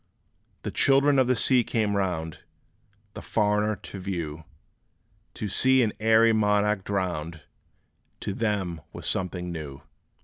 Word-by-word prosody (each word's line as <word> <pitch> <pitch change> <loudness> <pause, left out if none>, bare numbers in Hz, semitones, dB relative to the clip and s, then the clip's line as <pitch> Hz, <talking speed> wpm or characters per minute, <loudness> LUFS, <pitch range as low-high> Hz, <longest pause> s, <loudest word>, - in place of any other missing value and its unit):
The - - -4
children 140 0 +3
of 130 - +3
the 125 - +3
sea 125 +2 +3
came 110 -3 -1
round, 85 -5 -2 0.7
The - - -8
foreigner 105 0 +1
to 95 +1 -10
view. 85 -5 -5 0.9
To 105 - -4
see 130 +6 +4
an 110 - -1
airy 110 +1 +4
monarch 105 -1 +2
drowned, 85 -5 -3 0.8
To 100 - -3
them 95 -7 -2
was - - -8
something 90 -1 -1
new! 75 -5 -7
100 Hz, 130 wpm, -26 LUFS, 90-110 Hz, 0.9 s, see